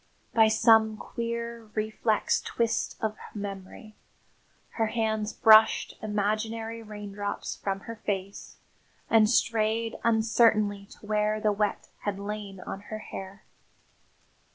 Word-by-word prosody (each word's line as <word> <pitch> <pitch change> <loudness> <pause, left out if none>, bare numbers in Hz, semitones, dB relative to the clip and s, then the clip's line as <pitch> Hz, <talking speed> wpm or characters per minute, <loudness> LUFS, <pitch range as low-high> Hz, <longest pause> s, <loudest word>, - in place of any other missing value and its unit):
By 220 -1 +6
some 220 0 +4
queer, 235 -1 -5
reflex 215 0 0
twist 230 -1 -1
of 220 -1 -1 0.2
memory, 200 +1 -7 0.8
her 225 -1 0
hands 220 -1 -1
brushed 220 -1 +5
imaginary 220 +2 -2
raindrops 205 -1 -5
from 195 -1 -3
her 230 +1 -8
face 200 -2 -5 0.5
and 220 -2 +6
strayed 225 -1 +1
uncertainly 220 -3 +3
to - - -15
where 210 0 +1
the 215 -1 +2
wet 205 0 -1
had 205 -2 -3
lain 200 -1 -6
on 195 - -6
her 215 - -4
hair. 195 -2 -9
215 Hz, 110 wpm, -28 LUFS, 205-225 Hz, 0.8 s, By